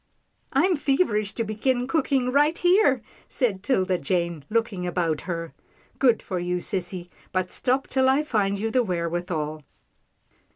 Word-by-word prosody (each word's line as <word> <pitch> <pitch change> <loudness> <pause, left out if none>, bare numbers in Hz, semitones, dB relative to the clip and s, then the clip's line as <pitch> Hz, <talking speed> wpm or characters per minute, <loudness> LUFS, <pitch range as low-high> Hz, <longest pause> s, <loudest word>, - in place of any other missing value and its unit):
" - - -46
I'm 365 -3 +3
feverish 270 - +1
to 230 - 0
begin 245 +4 0
cooking 270 -3 +1
right 295 +4 +3
here," 370 +5 +3 0.2
said 215 -8 -1
'Tilda 190 -6 +1
Jane 170 0 -1
looking 215 -5 -1
about 170 -3 0
her. 165 -1 -4 0.2
" 255 - -33
Good 250 -4 +3
for 185 - -3
you, 175 0 -1
sissy, 180 -1 -3 0.2
but 185 -1 -1
stop 260 +2 0
till 260 0 +2
I 275 +3 +3
find 205 -8 0
you 220 +3 -2
the 255 - +3
wherewithal. 170 -5 -2
210 Hz, 155 wpm, -25 LUFS, 180-260 Hz, 0.2 s, I'm